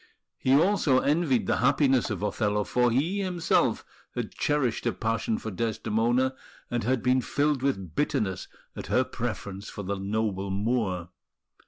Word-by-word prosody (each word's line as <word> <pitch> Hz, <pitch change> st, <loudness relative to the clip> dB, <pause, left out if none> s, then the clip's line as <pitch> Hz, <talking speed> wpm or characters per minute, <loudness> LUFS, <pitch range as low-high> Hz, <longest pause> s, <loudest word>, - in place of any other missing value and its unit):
He 130 Hz, +1 st, +3 dB
also 165 Hz, -4 st, +4 dB
envied 145 Hz, -1 st, +2 dB
the -, -, +1 dB
happiness 135 Hz, -1 st, +3 dB
of 105 Hz, -2 st, -3 dB
Othello; 105 Hz, 0 st, 0 dB
for 125 Hz, +3 st, +2 dB
he 155 Hz, +12 st, +1 dB
himself 180 Hz, -4 st, +1 dB, 0.3 s
had -, -, -3 dB
cherished 135 Hz, -6 st, 0 dB
a 120 Hz, -, +1 dB
passion 115 Hz, +2 st, -1 dB
for 110 Hz, -, -5 dB
Desdemona, 115 Hz, +5 st, 0 dB, 0.4 s
and 120 Hz, -1 st, -1 dB
had 125 Hz, +1 st, 0 dB
been 130 Hz, 0 st, +3 dB
filled 140 Hz, +3 st, 0 dB
with 95 Hz, -, -1 dB
bitterness 105 Hz, -, -1 dB, 0.3 s
at -, -, -7 dB
her -, -, +3 dB
preference 100 Hz, +1 st, -5 dB
for 100 Hz, -, -7 dB
the 100 Hz, +1 st, -3 dB
noble 100 Hz, -1 st, -1 dB
Moor. 100 Hz, -4 st, -1 dB
120 Hz, 150 wpm, -27 LUFS, 105-135 Hz, 0.4 s, also